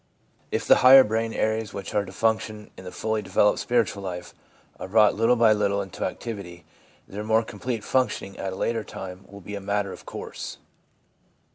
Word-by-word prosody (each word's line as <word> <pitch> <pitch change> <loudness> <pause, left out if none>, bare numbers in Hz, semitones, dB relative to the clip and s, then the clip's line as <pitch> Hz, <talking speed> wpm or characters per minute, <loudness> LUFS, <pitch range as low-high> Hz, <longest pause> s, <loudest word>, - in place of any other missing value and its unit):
If - - -2
the - - +6
higher 130 +1 +9
brain 115 +1 -1
areas 110 -1 -1
which 100 -1 -6
are 105 - +2
to 95 - -10
function 110 0 -1
in 95 - -12
the 90 - -7
fully 110 -1 -2
developed 105 +1 +2
spiritual 115 -5 0
life 90 -2 -6 0.5
are - - -6
brought 105 +2 +5
little 115 +3 +3
by 115 -2 +5
little 100 -1 +1
into 95 -3 -5
activity, 100 -7 -6 0.4
their 105 +2 -6
more 110 +1 +2
complete 115 0 -5
functioning 120 -6 -1
at 95 - -3
a - - -6
later 115 +2 -1
time 95 -1 -9
will 100 +1 -11
be 105 - -9
a 100 - -5
matter 100 0 -1
of - - -13
course. - - -7
105 Hz, 185 wpm, -25 LUFS, 95-110 Hz, 0.5 s, higher